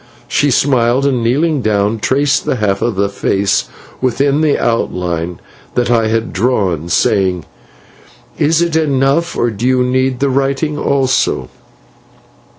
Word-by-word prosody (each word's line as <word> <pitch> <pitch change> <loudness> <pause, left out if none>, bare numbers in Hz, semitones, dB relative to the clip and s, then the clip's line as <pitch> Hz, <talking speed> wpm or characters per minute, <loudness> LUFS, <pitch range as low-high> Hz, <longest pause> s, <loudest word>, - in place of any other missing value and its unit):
"She 145 - +1
smiled, 130 -1 +2
and, 130 -4 +1
kneeling 145 +5 +1
down, 105 0 0
traced 140 +4 +1
the - - 0
half 100 -4 -1
of 115 -5 -1
a 100 +1 +2
face 100 0 0 0.3
within 135 +4 +1
the 155 -2 +2
outline 90 -6 -2 0.4
that 120 -1 +1
I 115 -2 +2
had 115 +1 -1
drawn, 95 - 0
saying: 95 -3 +1 0.9
"'Is 160 +3 +2
it 170 -2 -2
enough, 145 +1 +1
or 120 - +1
do 110 +4 -3
you 130 -1 +2
need 130 0 0
the 140 0 +1
writing 140 +3 0
also?' 130 - 0
125 Hz, 140 wpm, -15 LUFS, 105-140 Hz, 0.9 s, smiled